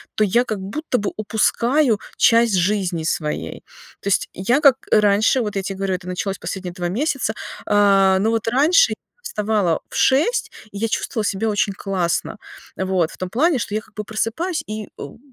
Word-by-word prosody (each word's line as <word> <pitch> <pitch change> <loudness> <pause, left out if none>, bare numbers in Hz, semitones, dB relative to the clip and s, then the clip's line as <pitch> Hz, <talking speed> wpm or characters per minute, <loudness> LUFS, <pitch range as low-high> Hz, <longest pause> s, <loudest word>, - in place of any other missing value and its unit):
то 215 - +2
я 235 +5 +3
как 215 -4 -3
будто 250 +8 -3
бы 205 -1 -2
упускаю 230 +4 +1 0.2
часть 230 -3 +4
жизни 180 -3 0
своей. 155 -1 -3 0.4
То - - -7
есть 200 - +1
я 240 +10 +1
как 275 -4 +7 0.2
раньше, 210 +4 +4
вот 210 -2 -3
я 195 - 0
те 195 +1 -4
говорю, 195 0 -2
это 180 0 -8
началось 190 +2 -3
последние 185 -2 -5
2 175 -2 -3
месяца, 255 - -1 0.3
э, 195 -2 +4
но 215 +3 +1
вот 225 -1 -1
раньше 320 - +4
я - - -6 0.3
вставала 210 - 0
в - - -10
6, 310 - +2 0.2
и - - -6
я 225 +2 -1
чувствовала 220 0 -2
себя 205 +3 -1
очень 205 0 +1
классно. 190 0 -2 0.4
Вот 185 -3 0
в - - -13
том 185 -1 -4
плане, 285 - +2
что 210 - -4
я 215 - +1
как - - -23
бы 210 - -5
просыпаюсь 230 - -2
и, 215 0 -6
м, - - -9
210 Hz, 190 wpm, -21 LUFS, 190-235 Hz, 0.4 s, как